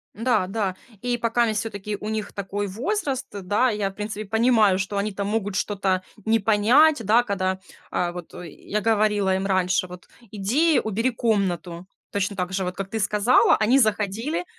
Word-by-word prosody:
Н-да, 225 -4 +1
да, 195 -2 -2 0.3
и 245 0 -1
покаместь 230 -2 +1
всё-таки 210 -1 -4
у 210 - -5
них 220 -1 -4
такой 200 +1 -3
возраст, 275 - -2
да, 205 +5 +1
я 210 -3 -1
в - - -19
принципе 210 0 -5
понимаю, 220 -3 +3
что 200 +1 -3
они 210 +1 -1
там 200 0 -4
могут 205 -2 -2
что-то 190 -2 0 0.2
не 225 +1 +3
понять, 230 +7 +4
да, 230 +4 +4
когда, 190 -4 -1 0.3
а, 175 -1 0
вот 175 -1 -9
и 175 -2 -8
я 210 +7 -4
говорила 210 -3 +2
им 190 +1 -2
раньше, 185 -1 +1
вот: 180 0 -12 0.2
"Иди, 260 +11 +2
убери 225 +4 0
комнату",- 185 -7 -1 0.3
точно 200 0 -1
так 180 0 -3
же, 190 0 -1
вот 180 0 -4
как 195 0 -5
ты 220 +2 -3
сказала, 210 +4 +4
они 225 +5 +3
заходили, 220 - 0
210 Hz, 175 wpm, -24 LUFS, 195-225 Hz, 0.3 s, понять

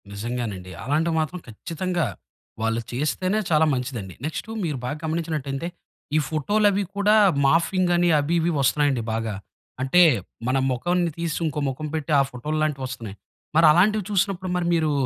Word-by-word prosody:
నిజంగానండి. 105 -4 -4
అలాంటివి 155 +6 +1
మాత్రం 155 +4 -4
ఖచ్చితంగా 170 - -3 0.6
వాళ్ళు 115 +1 0
చేస్తేనే 155 - 0
చాలా 160 -1 +4
మంచిదండి. 125 -7 -4
నెక్స్టు 160 +7 -4
మీరు 150 -5 -2
బాగా 145 +5 -3
గమనించినట్టయితే 155 -2 -2 0.5
ఈ - - +5
ఫోటోలవి 205 +6 +2
కూడా 205 +1 +4 0.3
మార్ఫింగ్ 170 +5 +2
అని 175 0 +3
అవి 150 +4 0
ఇవి 170 +1 +1
వస్తున్నాయండి 140 -2 +2
బాగా. 110 -2 -2 0.5
అంటే 135 +7 +4 0.5
మన 130 +1 +2
మొఖాన్ని 175 +7 0
తీసి 170 -2 -2
ఇంకో 150 -2 -2
ముఖం 145 +4 -5
పెట్టి 155 0 -3
ఆ - - +6
ఫోటోలాంటివొస్తున్నాయి. 135 -5 -3 0.4
మరి 165 +1 +6
అలాంటివి 205 +6 +3
చూసినప్పుడు 190 -1 0
మరి 175 -1 0
మీరు 155 -2 +1
155 Hz, 140 wpm, -24 LUFS, 130-175 Hz, 0.6 s, ఆ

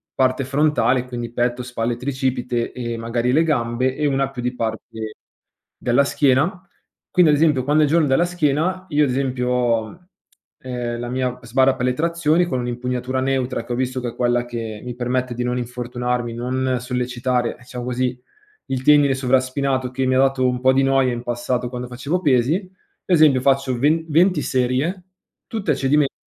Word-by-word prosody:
parte 130 0 +1
frontale”, 135 -2 +2
quindi 120 -2 -5
petto, 120 +1 0
spalle, 120 -1 -2
tricipite 130 -2 -2
e 120 -2 -4
magari 120 +2 -1
le 160 - +4
gambe, 130 -3 0
e 150 - -1
una 135 -1 0
più 130 -2 -6
di 125 +1 -2
parte 110 -1 -5 0.6
della 125 +3 +2
schiena. 145 +8 +1 0.5
Quindi, 175 -4 +5
ad 145 - +3
esempio, 150 -4 +3
quando 150 +2 +3
è - - +5
il 145 - -2
giorno 160 -2 +3
della 135 +6 +3
schiena 175 +2 0
io 150 -1 +3
ad 135 - -2
esempio 125 -1 -1
ho, 125 +7 -1 0.5
ehm, 120 -2 -4
la 120 0 -4
mia 125 0 -2
sbarra 130 +2 +2
per 125 -1 -2
le 125 - +2
trazioni 165 +2 +1
con 130 -7 -2
un'impugnatura 125 +1 -2
neutra, 130 -1 -1
che 120 - -4
ho - - -1
visto 130 +1 -2
che 120 - -3
è 115 - -11
quella 120 0 +1
che 115 -3 -6
mi 125 -1 -5
permette 125 0 -1
di 125 - -2
non 125 0 -1
infortunarmi, 125 0 -3
non 130 +2 -1
sollecitare, 125 -1 -1
diciamo 125 0 -8
così, 125 0 -1 0.5
il 130 -1 -3
tendine 145 -2 +5
sovraspinato, 130 0 0
che 130 +1 -1
mi 130 0 +2
ha 130 - +3
dato 135 -1 +3
un 125 0 -1
po' 130 0 +5
di 135 +1 +3
noia 135 -1 +3
in 120 0 -5
passato 120 +1 -2
quando 125 0 -5
facevo 140 +9 -3
pesi. 150 - +2 0.4
Esempio, 155 -7 +4
faccio 135 -1 +1
ven 155 +5 +2
venti 170 +1 +3
serie 130 +9 0 0.4
tutte 220 -3 -2
a - - +2
cedimento, 140 +1 +2
130 Hz, 185 wpm, -21 LUFS, 125-140 Hz, 0.6 s, Quindi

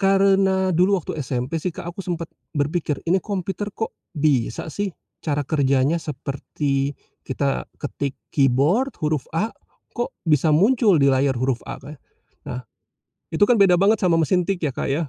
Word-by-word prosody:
karena 195 -1 +3
dulu 185 +4 +4
waktu 160 -2 -4
SMP 130 +4 -2
sih 185 - -1
Kak 175 - -7
aku 195 - -8
sempet 170 -3 -4 0.2
berpikir, 150 0 -1
ini 185 +3 +2
komputer 195 0 -3
kok 225 - -3 0.2
bisa 145 -2 0
sih 205 0 -1 0.3
cara 145 -2 -1
kerjanya 140 +2 +2
seperti 140 -1 -2 0.2
kita 135 +1 -2
ketik 140 -1 -4 0.2
keyboard, 145 - +2
huruf 150 -3 -1
A, 220 +6 0 0.4
kok 240 - -3
bisa 155 -1 +3
muncul 210 - +4
di 140 -2 +4
layar 130 -1 +2
huruf 130 0 0
A, - - -4
Kak. 145 0 -11 0.5
Nah, 125 - -4 0.7
itu 160 - -1
kan 245 - +5
beda 195 -4 +5
banget 210 +4 +3
sama 170 -3 +4
mesin 180 +3 +2
tik 190 +1 -1
ya, 135 - -1
Kak - - -2
ya. 155 +4 0
160 Hz, 165 wpm, -22 LUFS, 140-190 Hz, 0.7 s, kan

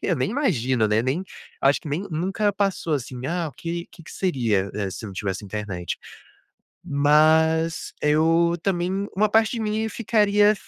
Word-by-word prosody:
Eu 180 - +1
nem 130 +7 -1
imagino, 130 - +1
né, 105 +2 +2
nem 135 +9 -1 0.4
acho 135 +1 +3
que - - -8
nem 150 +6 -2
nunca 195 +6 0
passou, 195 -5 0
assim: 125 -1 -5
"Ah, 170 0 -1
o - - -12
que 170 +2 -5
que 165 - -15
seria, 115 - 0
eh, 100 -2 -2
se 105 - -7
eu - - -5
não 95 - -10
tivesse 95 +1 -3
internet?". 100 -4 -4 0.9
Mas 160 +2 +3
eu 165 +3 +3
também 190 +1 -1
uma 210 +1 +3
parte 220 0 +3
de 235 - -3
mim 220 +1 -1
ficaria 210 -2 +3
160 Hz, 170 wpm, -24 LUFS, 130-195 Hz, 0.9 s, acho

